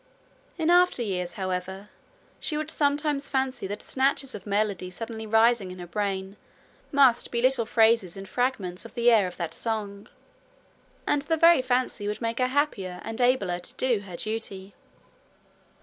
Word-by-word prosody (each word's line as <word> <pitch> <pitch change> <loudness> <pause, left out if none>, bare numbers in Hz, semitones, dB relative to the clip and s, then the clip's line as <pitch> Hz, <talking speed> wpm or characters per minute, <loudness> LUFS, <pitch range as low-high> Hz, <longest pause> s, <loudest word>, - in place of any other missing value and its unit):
In 330 0 +2
after 355 -8 +4
years, 180 -4 -3
however, 190 +1 -4 0.5
she 300 - -3
would 310 +1 -2
sometimes 290 -1 0
fancy 265 -6 -1
that 205 +2 -6
snatches 270 0 0
of 205 -1 -9
melody 200 -3 -1
suddenly 220 +3 -7
rising 225 -2 +3
in 180 - -8
her 175 - -7
brain 195 +1 -3 0.5
must 275 -5 +4
be 235 - -1
little 250 -2 +2
phrases 225 -6 +3
and 195 0 -8
fragments 195 -5 -2
of 230 - -12
the 240 0 +4
air 210 -5 +4
of 180 - -9
that 170 -2 -4
song; 205 -2 -4 1.0
and 290 - +1
the 325 +3 0
very 335 -3 +6
fancy 250 -4 -1
would 210 - -3
make 230 0 -2
her 255 - +3
happier, 240 -10 -1
and 225 +2 -5
abler 225 -8 +2
to 175 - -10
do 245 -4 +1
her 190 -4 -9
duty. 205 -3 -5
225 Hz, 165 wpm, -26 LUFS, 195-260 Hz, 1.0 s, very